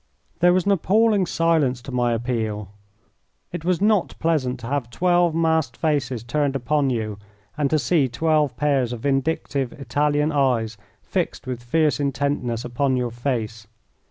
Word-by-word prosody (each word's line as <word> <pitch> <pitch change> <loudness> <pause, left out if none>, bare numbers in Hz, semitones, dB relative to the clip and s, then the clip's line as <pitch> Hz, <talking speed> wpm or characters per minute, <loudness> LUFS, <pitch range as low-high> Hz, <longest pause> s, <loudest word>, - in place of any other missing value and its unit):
There 175 +1 +5
was 180 -1 +2
an 200 - +3
appalling 200 +1 +3
silence 160 -7 +1
to 135 - -8
my 120 -1 +1
appeal. 110 -4 -3 0.8
It 175 -2 -5
was 180 0 +1
not 205 -2 +2
pleasant 135 -6 0
to - - -7
have 135 -3 -2
twelve 175 +5 +2
masked 160 -7 +1
faces 135 -7 -1
turned 140 +3 -1
upon 140 +2 +1
you 110 -4 -3 0.4
and 145 -2 0
to 155 - +2
see 140 +1 +2
twelve 150 0 +1
pairs 135 -4 +1
of 115 - -7
vindictive 135 -1 -1
Italian 145 +2 0
eyes 125 -6 +1 0.3
fixed - - -3
with 125 -2 -4
fierce 150 +6 +1
intentness 140 -4 -1
upon 130 +2 0
your 125 -1 -1
face. 115 -3 -3
140 Hz, 155 wpm, -23 LUFS, 120-160 Hz, 0.8 s, There